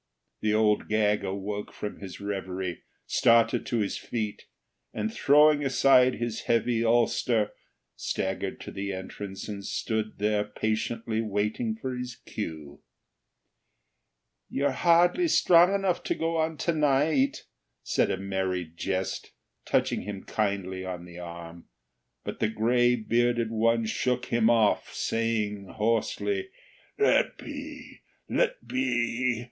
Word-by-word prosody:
The 110 - +1
Old 105 -1 +2
Gag 105 -1 +2
awoke 100 +2 -4
from 105 - -6
his 95 -3 -8
reverie, 95 -3 -4 0.2
started 115 0 +3
to 120 - 0
his 100 - -2
feet, 110 -3 -4 0.5
and, 110 0 -2
throwing 150 +1 +5
aside 130 -1 +5
his 120 -2 -4
heavy 115 0 +2
ulster, 115 -1 +2 0.4
staggered 95 0 -3
to - - -7
the 100 0 -4
entrance 95 +1 -7
and 100 -2 -6
stood 110 +2 -2
there 105 0 +1
patiently 110 +1 -2
waiting 105 +1 -1
for 130 +3 -4
his 125 -1 -5
cue. 80 -8 -7 1.7
"You're 140 +1 0
hardly 175 - +4
strong 175 - +5
enough 195 -3 0
to - - 0
go 165 0 -1
on 160 0 0
to 170 - +2
night," 145 -2 +2 0.4
said - - +1
a - - 0
Merry 95 -2 -2
Jest, 95 +2 -3 0.3
touching - - +1
him 100 -1 -6
kindly 95 -3 -2
on 90 -2 -6
the 90 0 -11
arm; 85 -1 -9 0.6
but - - -6
the 110 - +1
gray 120 +3 +3
bearded 120 0 +1
one 115 +1 +2
shook 125 +3 -1
him 115 -1 +4
off, 115 -3 +3
saying 110 -3 -1
hoarsely: 115 - 0 0.5
"Let 425 - +3
be! - - -9 0.3
Let - - 0
be! 125 - 0
110 Hz, 125 wpm, -27 LUFS, 100-125 Hz, 1.7 s, throwing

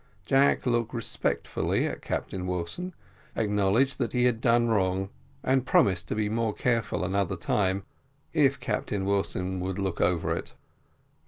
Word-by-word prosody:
Jack 135 +1 +3
looked 120 -1 0
respectfully 115 - -1
to - - -3
Captain 90 -1 -4
Wilson, 90 - -3 0.4
acknowledged 110 +5 +2
that 120 -4 -1
he 125 -1 +2
had 120 -2 +2
done 120 -1 +3
wrong, 95 -3 +1 0.3
and 130 0 +2
promised 95 -3 +3
to - - -2
be 105 -1 0
more 110 0 -1
careful 115 -4 0
another 100 -1 0
time, 95 -1 0 0.5
if 140 -3 +3
Captain 95 -2 -2
Wilson 95 -2 -1
would 95 0 -3
look 95 -3 -2
over 85 -1 +1
it. - - -7
105 Hz, 145 wpm, -27 LUFS, 95-120 Hz, 0.5 s, Jack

